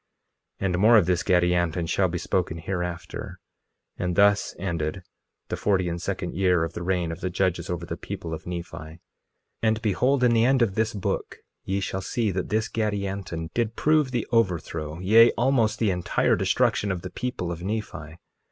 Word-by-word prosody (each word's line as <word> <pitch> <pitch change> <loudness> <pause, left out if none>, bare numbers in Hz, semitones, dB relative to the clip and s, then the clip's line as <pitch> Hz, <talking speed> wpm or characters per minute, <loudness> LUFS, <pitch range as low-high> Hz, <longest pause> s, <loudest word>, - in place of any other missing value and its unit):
2:12 - - 0
And 90 -2 +1
more 110 +3 +7
of 100 - +4
this 90 0 +1
Gadianton 90 -2 +1
shall 95 +3 +2
be 90 0 -3
spoken 85 -2 -1
hereafter. 90 0 -5 0.6
And 90 -1 -2
thus 100 0 +3
ended 85 -1 -3 0.5
the - - -1
forty 95 -3 +1
and 85 0 -4
second 95 -1 -3
year 90 -3 +2
of 80 0 -4
the 85 - -6
reign 90 -2 0
of 80 - -7
the 95 - -1
judges 90 -1 -1
over 85 -1 -3
the - - -4
people 80 -1 -6
of 80 - -7
Nephi. 85 -1 -5
2:13 80 +1 -10 0.6
And 110 0 +1
behold, 125 +6 +2
in 120 -1 +5
the 115 -1 +4
end 130 0 +4
of 105 -5 0
this 110 +2 0
book 100 - -3 0.3
ye 95 +1 -1
shall 95 0 -3
see 110 +2 -1
that 95 0 -3
this 110 +1 0
Gadianton 100 -7 -3
did 115 -2 -1
prove 155 0 +3
the 120 -4 -2
overthrow, 85 -8 0
yea, 110 +6 +6
almost 120 -3 +2
the 110 -4 +1
entire 90 -1 +1
destruction 100 - +1
of 90 -2 -4
the - - -6
people 120 -8 -3
of 85 0 -6
Nephi. 90 -6 -5
95 Hz, 190 wpm, -25 LUFS, 85-110 Hz, 0.6 s, more